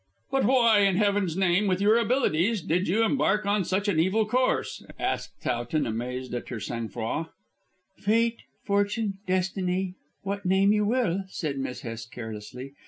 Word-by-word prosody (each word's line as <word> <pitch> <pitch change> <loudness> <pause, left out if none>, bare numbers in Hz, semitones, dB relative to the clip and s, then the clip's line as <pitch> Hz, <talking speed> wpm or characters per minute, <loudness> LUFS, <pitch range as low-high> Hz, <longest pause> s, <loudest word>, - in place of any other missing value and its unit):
"But 270 -1 +2
why, 235 -4 +5
in 195 -2 +4
heaven's 200 -4 +1
name, 190 +2 +3
with 185 -1 +1
your 215 +3 +4
abilities, 225 - +1
did 180 +2 0
you 215 +6 +2
embark 210 -3 +2
on 200 0 +2
such 190 +4 -1
an 190 -6 +2
evil 190 +6 +2
course?" 255 +4 0
asked - - -3
Towton 120 +5 -1
amazed 125 +3 -4
at 120 - -4
her 120 - -4
sang 115 +2 -4
froid. 120 +8 -3 0.7
"Fate, 230 +3 +2 0.2
Fortune, 205 0 0
Destiny: 185 0 0 0.3
what 200 +1 -3
name 190 +2 +4
you 210 0 +2
will," 195 -6 +1
said 150 -7 -4
Miss 130 -1 -4
Hest 115 0 -7
carelessly. 115 +4 -8
190 Hz, 160 wpm, -27 LUFS, 145-210 Hz, 0.7 s, why